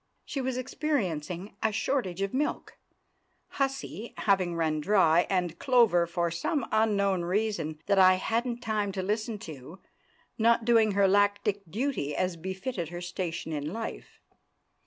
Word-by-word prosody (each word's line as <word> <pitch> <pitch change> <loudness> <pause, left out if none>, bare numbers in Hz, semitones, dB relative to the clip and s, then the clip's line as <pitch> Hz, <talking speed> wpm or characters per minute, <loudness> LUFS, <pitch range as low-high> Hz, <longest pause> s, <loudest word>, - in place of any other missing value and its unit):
She 275 - -3
was 260 -1 -2
experiencing 200 - -2
a 220 - +2
shortage 200 -5 -1
of 195 - -3
milk, 290 +3 -2 0.7
"Hussy" 270 -5 -3
having 185 -4 +1
run 155 -2 0
dry, 175 -2 +4
and 180 -3 -1
"Clover," 230 -10 +4
for 170 0 -1
some 240 - -1
unknown 200 -4 +2
reason 175 -4 -1
that 200 -1 +3
I 185 0 +7
hadn't 235 +5 -1
time 215 -3 -1
to 190 - -3
listen 215 +3 -2
to, 155 - -10 0.6
not 230 0 +3
doing 225 -3 +4
her 200 0 +4
lactic 205 +1 +2
duty 210 - -2
as 185 -1 0
befitted 190 - -4
her 175 0 -6
station 175 -2 -4
in 150 +1 -3
life. 225 +3 -6
195 Hz, 140 wpm, -28 LUFS, 175-225 Hz, 0.7 s, I